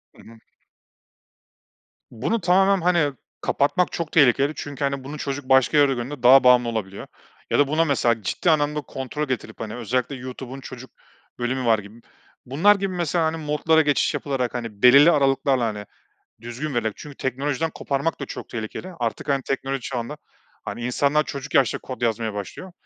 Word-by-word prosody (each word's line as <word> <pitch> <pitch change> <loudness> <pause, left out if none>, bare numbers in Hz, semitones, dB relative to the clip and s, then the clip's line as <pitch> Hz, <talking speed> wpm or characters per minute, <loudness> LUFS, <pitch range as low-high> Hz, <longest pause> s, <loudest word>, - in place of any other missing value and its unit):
Hı - - -16
hı. 115 0 -15 1.7
Bunu 170 - -2
tamamen, 190 +2 +3
hani, 170 -5 +2 0.3
kapatmak 145 +6 +1
çok 165 -2 -4
tehlikeli 140 0 +4
çünkü, 145 0 -6
hani, 140 -1 -1
bunu 145 +3 -7
çocuk 140 -2 -5
başka 130 +2 +4
yerde 140 -2 +5
gördüğünde 125 +1 -6
daha 130 +2 +8
bağımlı 125 -1 +5
olabiliyor 100 -4 -5 0.4
ya - - +2
da 145 - +4
buna, 160 +3 +2
mesela, 120 -6 +1
ciddi 175 - -1
anlamda 150 -1 +1
kontrol 140 +2 -5
getirip, 130 -2 -5
hani, 110 -1 -5
özellikle 125 +3 -2
YouTube'un 130 +1 -8
çocuk 130 -1 -10 0.5
bölümü 125 +1 -2
var, 115 -2 +3
gibi. 105 +3 -13 0.4
Bunlar 165 +11 +4
gibi, 195 -1 -3
mesela, 170 -1 0
hani, 160 +1 -1
modlara 155 +1 +2
geçiş 145 -2 +1
yapılarak, 130 -4 -2
hani, 115 -5 -6
belirli 140 +7 +8
aralıklarla, 135 -3 +2
hani, 105 -2 -4 0.6
düzgün 120 +5 -5
vererek 110 -3 -1
çünkü 145 -2 -11
teknolojiden 140 +4 -2
koparmak 140 +3 -2
da 140 - -4
çok - - -8
tehlikeli 115 +11 -6
artık, 115 +4 -3
hani, 140 -1 +1
teknoloji 135 +1 -3
çağında, 125 +3 -5 0.5
hani, 120 - -5
insanlar 145 +4 +1
çocuk 140 0 -7
yaşta 135 -7 +3
kod 130 - -9
yazmaya 115 -2 -1
başlıyor. 105 - -7
135 Hz, 165 wpm, -23 LUFS, 120-150 Hz, 1.7 s, daha